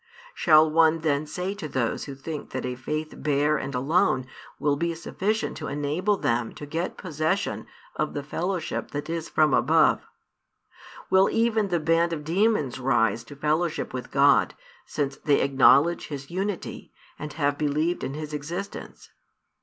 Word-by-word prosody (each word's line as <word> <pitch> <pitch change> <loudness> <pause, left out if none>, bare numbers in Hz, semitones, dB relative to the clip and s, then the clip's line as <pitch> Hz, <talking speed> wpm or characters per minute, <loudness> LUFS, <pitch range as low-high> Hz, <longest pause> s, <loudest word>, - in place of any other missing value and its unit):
Shall 155 -2 +5
one 160 0 +4
then 150 -1 0
say 180 +5 -3
to 200 -6 -6
those 130 -5 -2
who 140 - -7
think 150 +2 -6
that 130 - -4
a 125 - -2
faith 155 +5 -4
bare 150 +1 +1
and 140 - -5
alone 130 -1 +2 0.3
will 145 -1 +1
be 170 +3 -1
sufficient 205 +6 -2
to - - -5
enable 155 +8 0
them 115 -5 -1
to 145 - -8
get 165 +5 -3
possession 160 +2 -2 0.3
of - - -2
the 145 - -3
fellowship 175 +3 -3
that 145 +3 -5
is 165 -1 -4
from 155 -3 +3
above, - - +3 1.0
will 190 +1 +5
even 225 -2 +1
the 175 -3 0
band 165 +2 +2
of 150 -2 -4
demons 165 - +1
rise 115 -4 +1
to 145 - -11
fellowship 155 +3 -1
with 125 -2 -5
God, 140 +1 +4 0.3
since 140 -2 -2
they 145 -1 +2
acknowledge 140 +4 +4
His 140 -1 -7
Unity, 195 +1 -4 0.3
and 150 0 -6
have 145 -2 0
believed 155 +4 0
in 135 - -4
His 155 0 -6
Existence? 170 +7 -6
155 Hz, 160 wpm, -25 LUFS, 140-170 Hz, 1.0 s, Shall